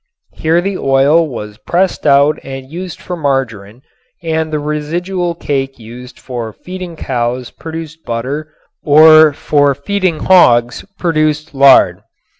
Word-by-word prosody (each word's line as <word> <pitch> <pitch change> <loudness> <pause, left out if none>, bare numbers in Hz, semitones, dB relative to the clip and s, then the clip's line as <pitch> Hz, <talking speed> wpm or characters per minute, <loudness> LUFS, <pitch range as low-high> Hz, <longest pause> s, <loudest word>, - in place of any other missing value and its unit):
Here 165 +2 +1
the 195 +1 -3
oil 140 +5 +3
was 105 -4 -8
pressed 180 -2 -1
out 140 +1 +3
and 135 0 -9
used 180 +1 -7
for 180 - -6
margarin 130 - -3 0.4
and 160 -1 -2
the 155 - -1
residual 170 +4 -3
cake 135 -4 -3
used 120 +2 -12
for 120 -3 -6
feeding 180 - -8
cows 125 -3 -3
produced 160 0 -9
butter 135 +7 -4 0.3
or 155 +1 +6
for 145 -1 +1
feeding 185 +2 -2
hogs 120 -10 +3
produced 155 -3 -1
lard. 135 -1 +5
150 Hz, 125 wpm, -14 LUFS, 130-165 Hz, 0.4 s, or